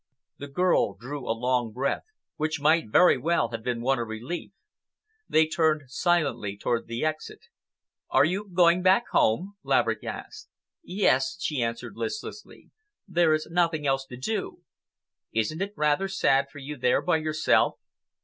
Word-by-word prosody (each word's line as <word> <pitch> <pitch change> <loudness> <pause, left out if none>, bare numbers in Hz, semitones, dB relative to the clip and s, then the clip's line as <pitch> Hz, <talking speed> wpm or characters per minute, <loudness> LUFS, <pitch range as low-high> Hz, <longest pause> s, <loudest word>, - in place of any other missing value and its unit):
The 145 - -6
girl 145 - +1
drew 130 +8 -7
a 115 - 0
long 125 -1 0
breath, 130 +5 -2 0.3
which 155 -1 -2
might 155 -3 +3
very 175 +3 +5
well 160 -4 +1
have 115 -1 -5
been 120 0 -2
one 135 +1 +1
of 115 - -3
relief. 120 - -6 0.8
They 160 0 +4
turned 155 -1 +1
silently 145 - 0
toward 115 +3 -1
the 115 +5 -3
exit. 155 0 -4 0.7
"Are - - +4
you 195 +5 -2
going 175 0 +4
back 190 +6 +4
home?" 185 - +1
Laverick - - +1
asked. 425 -1 -8 0.3
"Yes," 185 - +1
she 150 -8 -1
answered 115 0 -4
listlessly. 425 0 -7 0.4
"There 170 -4 +3
is 155 - -4
nothing 165 -3 +1
else 135 -1 0
to 125 - -9
do." 200 - -4 0.7
"Isn't 115 - -1
it 200 +1 -3
rather 150 +5 +1
sad 140 -8 +2
for 145 - -14
you 145 +1 -7
there 125 0 +2
by 175 -3 +2
yourself?" 155 0 +2
155 Hz, 155 wpm, -26 LUFS, 125-175 Hz, 0.8 s, very